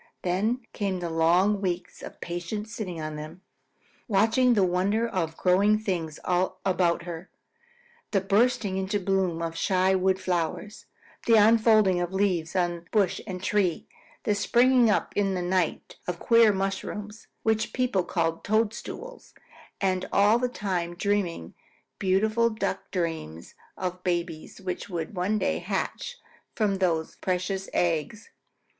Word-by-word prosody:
Then 210 +8 0
came 195 -3 -2
long 175 +4 +2
weeks 180 -2 -3
of - - -10
patient 175 +5 -4
sitting 205 -6 -5
on 155 -1 -5
them, 155 +4 -9 0.7
watching 230 +4 +3
the 200 - +4
wonder 190 +6 +1
of 165 -7 -2
growing 200 +4 +4
things 175 -8 -3
about 180 -1 +1
her, 170 +1 -7 0.8
the 200 - +2
bursting 200 0 +1
into 190 +2 -1
bloom 185 -3 0
of 165 0 -3
shy 185 +2 +2
wood 190 0 +2
flowers, 185 +3 -3 0.4
the 230 - +6
unfolding 215 -4 +5
of 175 +1 -3
leaves 185 -4 0
on 175 -2 -1
bush 200 -5 +1
and 185 -2 -6
tree, 190 -6 0 0.4
the 210 - +2
springing 240 +3 +4
up - - +1
in 195 -2 +1
a - - -2
night 180 -1 -1
of 180 -1 -2
queer 230 +2 +5
mushrooms, 205 +2 -4 0.2
which 220 -1 +1
people 250 -7 +1
call 165 -2 -1
toadstools, 225 - -3 0.4
and 185 -1 0
all 210 +4 +4
the 250 0 0
time 180 -7 -3
dreaming 180 - -1 0.5
beautiful 215 +5 +2
Duck 215 -1 -3
dreams 160 - -4 0.2
of 185 -1 -1
the 180 - -20
babies 175 -3 -3
which 185 +1 -5
would 170 0 -4
one 185 +4 0
day - - 0
hatch - - -3 0.4
from 200 -3 +1
those 165 -4 0
precious 190 +1 -2
eggs. 175 +5 -1
190 Hz, 140 wpm, -27 LUFS, 175-210 Hz, 0.8 s, the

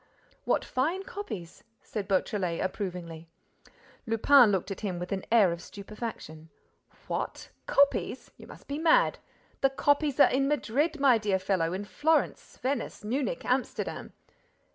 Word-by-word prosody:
"What - - +1
fine 320 +9 -1
copies!" 215 - -7 0.2
said 205 -3 -5
Beautrelet, 185 -3 0
approvingly. 180 -4 -5 0.8
Lupin 225 +1 +6
looked 195 0 -1
at 195 - -5
him 190 -5 -3
with 180 +1 -6
an 195 -1 -2
air 215 -6 +5
of 170 0 -5
stupefaction: 200 -7 -8 0.6
"What! - - -4 0.2
Copies! 280 0 +1
You - - -14
must - - -14
be 285 +2 -3
mad! - - +3 0.4
The 270 - +4
copies 285 +1 +1
are - - +8
in 275 +1 +2
Madrid, 295 +3 0
my 265 -5 +5
dear 205 -3 +1
fellow, 185 -3 0
in 195 +2 -4
Florence, 310 +8 0
Venice, 270 -3 -3
Munich, 265 - -2
Amsterdam." - - -2
220 Hz, 140 wpm, -28 LUFS, 185-280 Hz, 0.8 s, are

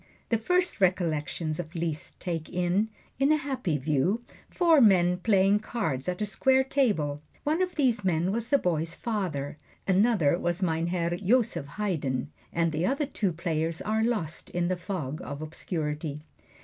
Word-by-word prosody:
The 230 - +2
first 360 - +1
recollections 165 -3 0
of 170 0 -6
Liszt 165 0 -4
take 165 -3 -3
in, 180 +4 +1 0.3
in 275 +2 +4
a - - +6
happy 260 - -1
view, 155 - +1 0.3
four 330 -5 +4
men 180 -5 +5
playing 195 0 +3
cards 180 - -2
at 180 +4 -2
a - - +1
square 265 +6 +3
table. 205 - +1 0.2
One 310 +4 +1
of 365 -1 -1
these 250 -8 +2
men 175 0 +1
was 230 +2 -2
the 280 - +5
boy's 165 - -1
father, 175 - -3 0.3
another 190 -5 +3
was 175 +2 -1
Mein 165 -1 +1
Herr 175 -1 0
Joseph 205 - +1
Haydn, 145 -9 -1 0.2
and 165 -1 +1
the 155 +2 -1
other 275 +9 +1
two 210 -8 -1
players 165 -1 -2
are 220 +1 0
lost 210 -10 -2
in 175 0 -1
the 185 - +1
fog 170 -6 -4
of 140 0 -6
obscurity. 155 -1 -4
180 Hz, 160 wpm, -28 LUFS, 160-220 Hz, 0.3 s, a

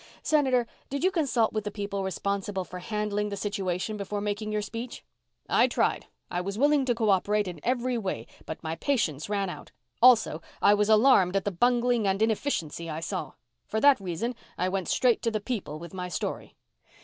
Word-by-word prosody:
"Senator, 265 -5 +3 0.2
did 280 +3 -3
you 375 - +4
consult 260 - +1
with 215 -1 -1
the 210 - -3
people 200 -1 -4
responsible 195 0 -2
for 180 - -8
handling 210 +1 -2
the 200 - -4
situation 200 0 -2
before 205 +1 -3
making 210 +1 -3
your 210 0 -1
speech?" 230 +3 -7 0.4
"I - - +4
tried. - - 0 0.2
I 175 - -1
was 200 +2 -4
willing 290 +1 +3
to 245 -2 +1
co 220 -3 +2
operate 205 +2 +2
in 175 -3 -6
every 250 0 0
way, 185 - -3 0.2
but 160 - -6
my 160 0 -3
patience 165 - 0
ran 200 -2 0
out. 180 - -8 0.3
Also, 230 -10 +5 0.2
I 205 - +6
was 210 0 +2
alarmed 215 -5 +5
at 195 - +1
the 205 - 0
bungling 240 +2 +2
and 195 0 +1
inefficiency 210 - -1
I 155 0 -3
saw. 165 - -4 0.3
For 220 - -1
that 280 0 +6
reason 195 +6 -3 0.2
I 185 - 0
went 190 -1 -2
straight 245 -3 +3
to 230 - +1
the 215 -1 -1
people 200 - -4
with 170 +2 -10
my 180 -1 -4
story." - - -4
210 Hz, 195 wpm, -28 LUFS, 190-235 Hz, 0.4 s, I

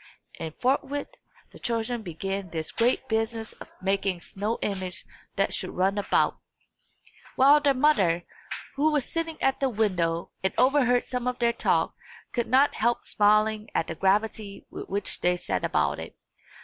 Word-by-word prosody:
And 160 -1 -5
forthwith 275 +2 0 0.4
the - - -14
children 235 0 -2
began 195 +1 -4
this 160 -1 -4
great 245 +3 +1
business 225 0 -2
of - - -9
making 195 -1 0
a - - -17
snow 210 +6 -3
image 190 -2 -3 0.3
that 195 0 +1
should 185 - -1
run 195 +2 +1
about; 200 - +1 1.0
while 280 +3 +6
their 280 -2 +3
mother, 195 - +3 0.5
who 305 +2 +3
was 290 -4 +1
sitting 330 -1 -3
at 270 0 +2
the 270 - +2
window 180 -7 0
and 190 - +1
overheard 250 -1 +4
some 250 -1 -3
of 250 0 -1
their 235 -1 +2
talk, - - +1 0.4
could 240 -2 -1
not 270 +4 +4
help 235 +2 0
smiling 215 +1 +2
at - - +2
the - - -5
gravity 200 +3 0
with - - -7
which 200 0 -2
they 180 0 +2
set - - -2
about - - +1
it. - - -8
220 Hz, 160 wpm, -27 LUFS, 190-255 Hz, 1.0 s, while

